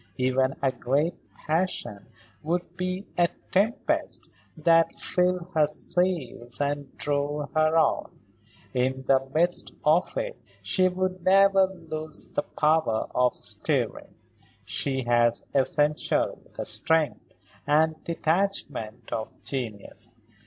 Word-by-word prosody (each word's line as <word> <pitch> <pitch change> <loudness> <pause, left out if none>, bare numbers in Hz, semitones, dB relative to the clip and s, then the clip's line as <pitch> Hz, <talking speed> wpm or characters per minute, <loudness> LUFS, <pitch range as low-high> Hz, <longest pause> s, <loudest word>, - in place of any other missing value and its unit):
Even 130 +1 +1
a 135 - +3
great 140 +6 0 0.3
passion 155 - -2 0.3
would 175 +3 -2
be 185 +2 -3
a 170 -1 +4 0.2
tempest 205 +5 0 0.3
that 165 +1 +4
filled 180 -1 0
her 155 -2 +4
sails 150 -7 0
and 145 -1 -2
drove 145 0 -1
her 155 +1 +3
on; 160 - +2 0.6
in 130 +1 0
the 135 0 +3
midst 175 +2 +2
of - - +3
it - - -4 0.2
she 185 -1 +3
would 185 0 -2
never 195 0 +5 0.2
lose 155 0 -4
the - - -1
power 150 -7 +1
of 125 -1 +2
steering. - - -3 0.5
She 135 -2 -1
has 120 -1 +2
essentially 145 +3 +1
the - - -4
strength 160 -2 0 0.3
and 155 +1 +2
detachment 155 - -2
of 110 -1 -5
genius. 115 -4 -5
155 Hz, 110 wpm, -26 LUFS, 130-175 Hz, 0.6 s, never